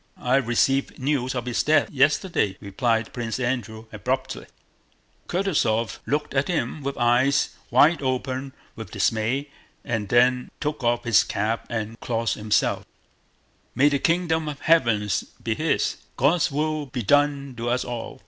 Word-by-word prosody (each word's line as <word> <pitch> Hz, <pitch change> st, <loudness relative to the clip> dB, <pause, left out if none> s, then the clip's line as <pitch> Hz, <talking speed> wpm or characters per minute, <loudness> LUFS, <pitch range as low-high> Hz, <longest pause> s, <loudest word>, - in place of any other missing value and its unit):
"I 125 Hz, +2 st, +2 dB
received 135 Hz, +2 st, +1 dB
news 130 Hz, -2 st, -1 dB
of 125 Hz, -1 st, -3 dB
his 125 Hz, -1 st, 0 dB
death, 155 Hz, +1 st, +2 dB
yesterday," 140 Hz, -, +1 dB
replied 115 Hz, +3 st, -1 dB
Prince 120 Hz, 0 st, -3 dB
Andrew 120 Hz, -3 st, -3 dB
abruptly. 130 Hz, +5 st, -3 dB, 0.8 s
Kutúzov 145 Hz, -, 0 dB
looked 150 Hz, +1 st, -1 dB
at 135 Hz, 0 st, +1 dB
him 155 Hz, -4 st, -2 dB
with 140 Hz, 0 st, -4 dB
eyes 125 Hz, +3 st, +3 dB, 0.2 s
wide 165 Hz, +2 st, +4 dB
open 130 Hz, 0 st, -2 dB, 0.2 s
with 110 Hz, -5 st, -8 dB
dismay 115 Hz, +7 st, 0 dB, 0.4 s
and 110 Hz, -5 st, -2 dB
then 125 Hz, +1 st, +3 dB
took 150 Hz, -2 st, -3 dB
off 120 Hz, 0 st, +1 dB
his 110 Hz, -4 st, +4 dB
cap 110 Hz, +3 st, -2 dB
and 110 Hz, 0 st, -4 dB
crossed 115 Hz, -1 st, -1 dB
himself: 105 Hz, 0 st, 0 dB, 0.9 s
"May 140 Hz, +4 st, +5 dB
the 140 Hz, -1 st, 0 dB
kingdom 165 Hz, -2 st, +1 dB
of 145 Hz, -1 st, -7 dB
Heaven 115 Hz, -11 st, +3 dB, 0.4 s
be -, -, 0 dB
his! -, -, 0 dB, 0.2 s
God's 155 Hz, +6 st, +3 dB
will 155 Hz, +1 st, -1 dB
be 125 Hz, -2 st, -4 dB
done 140 Hz, +3 st, +2 dB
to 120 Hz, +1 st, -2 dB
us 125 Hz, +1 st, 0 dB
all!" 120 Hz, -2 st, -6 dB
125 Hz, 145 wpm, -24 LUFS, 115-145 Hz, 0.9 s, May